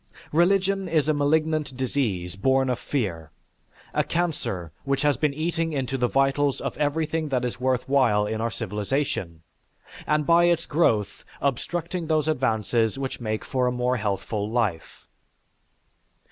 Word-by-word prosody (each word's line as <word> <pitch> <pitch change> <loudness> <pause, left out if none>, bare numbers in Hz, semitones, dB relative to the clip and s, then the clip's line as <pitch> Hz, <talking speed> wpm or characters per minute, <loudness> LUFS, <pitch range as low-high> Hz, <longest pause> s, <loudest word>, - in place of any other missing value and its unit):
Religion 190 +3 +2
is 155 -3 +2
a 155 - +3
malignant 150 -1 +1
disease 110 -10 -1
born 130 +5 +2
of 125 - -2
fear, 90 - -3 0.6
a - - +2
cancer 145 - -2
which 140 +1 0
has 145 -1 +3
been 150 +4 +1
eating 165 +2 -1
into 135 -2 -2
the 125 -2 +1
vitals 135 +1 +2
of - - -4
everything 155 +1 0
that 125 -2 0
is 120 0 -4
worth 130 0 0
while 120 -7 +3
in 110 +1 -2
our 115 - 0
civilization; 105 - -3 0.6
and 150 0 +2
by 170 +3 +5
its 170 -1 +2
growth 115 -10 +1 0.2
obstructing 165 +6 -2
those 155 -1 +1
advances 115 -5 +1
which 135 -2 -4
make 110 -2 -3
for 130 -2 0
a - - +1
more 125 +1 0
healthful 105 0 -2
life. 110 -8 -2
135 Hz, 145 wpm, -25 LUFS, 115-155 Hz, 0.6 s, by